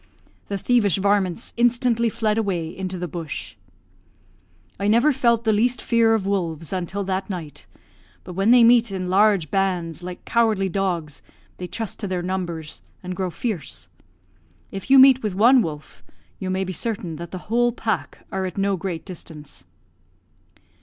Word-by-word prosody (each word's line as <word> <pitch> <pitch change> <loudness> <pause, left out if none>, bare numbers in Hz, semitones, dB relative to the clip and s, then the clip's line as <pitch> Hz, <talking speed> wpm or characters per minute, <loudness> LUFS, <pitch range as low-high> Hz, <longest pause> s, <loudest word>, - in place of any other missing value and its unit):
The 200 - -2
thievish 210 -4 +2
varmints 200 0 0
instantly 235 -1 +2
fled 215 -1 0
away 175 -6 -2
into 185 -1 -4
the 180 0 -4
bush. 165 -7 -6 1.3
"I 200 - 0
never 240 +8 +4
felt 235 -3 +2
the 220 -2 +2
least 240 +4 +2
fear 230 -2 +3
of 205 -4 -2
wolves 170 -5 -2
until 190 +2 -3
that 190 +1 -2
night; 170 -6 -7 0.6
but 180 - -8
when 195 +4 +1
they 245 0 +7
meet 235 -1 +5
in 185 -1 -3
large 195 -5 +3
bands, 180 -4 -1
like 180 0 -8
cowardly 220 -5 +2
dogs, 175 -5 -2 0.4
they 180 - -5
trust 225 +2 -5
to 205 - -3
their 180 -2 -2
numbers, 175 -4 -4 0.2
and 180 0 -5
grow 185 -1 -2
fierce. 150 - -5 0.8
If 195 +4 -7
you 270 - +7
meet 265 0 +8
with 210 -4 -3
one 240 +6 +6
wolf, 155 -6 -6 0.4
you 190 - -4
may 190 +1 0
be 185 0 -4
certain 185 -6 -3
that 170 +1 -7
the 185 - -6 0.2
whole 240 0 +3
pack 215 - -3
are 190 -1 -2
at 185 - -8
no 195 0 +1
great 175 -3 -5
distance." 160 -5 -10
195 Hz, 165 wpm, -23 LUFS, 175-225 Hz, 1.3 s, meet